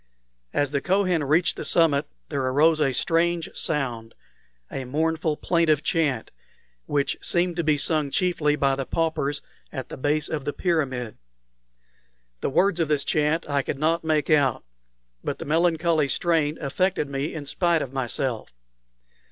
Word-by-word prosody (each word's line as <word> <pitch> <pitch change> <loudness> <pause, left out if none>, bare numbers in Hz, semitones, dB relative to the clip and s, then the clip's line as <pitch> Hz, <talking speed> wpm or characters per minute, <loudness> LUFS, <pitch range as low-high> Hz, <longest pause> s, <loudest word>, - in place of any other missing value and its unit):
As 145 -1 0
the 140 -1 0
Kohen 185 -2 +1
reached 155 +5 +2
the - - -4
summit 155 -4 +2 0.2
there 140 -3 -1
arose 150 +5 +3
a 140 -3 +3
strange 165 +4 0
sound 120 -7 -2 0.6
a 135 - -4
mournful, 155 +3 -1
plaintive 165 -4 +2
chant, 150 -9 0 0.6
which 140 -2 0
seemed 175 0 +1
to 170 - 0
be 155 -1 +2
sung 150 0 +1
chiefly 155 -2 +1
by 140 -2 +2
the 135 -1 -4
paupers 150 -3 -1 0.3
at 130 -4 -6
the - - -7
base 145 +3 +1
of 155 -3 -3
the 145 - -3
pyramid. 130 - -1 1.2
The - - -1
words 180 +5 +2
of 165 - +1
this 150 -2 +1
chant 155 +2 +1
I 140 -1 +1
could 135 - -4
not 160 +3 +1
make 155 -1 +1
out, 140 -5 +3 0.6
but - - -3
the - - -7
melancholy 165 -1 +2
strain 160 0 +1
affected 150 +3 0
me 140 +3 -3
in 150 -3 -5
spite 170 +2 +1
of 130 - -8
myself. 130 -2 -2
150 Hz, 155 wpm, -25 LUFS, 140-165 Hz, 1.2 s, arose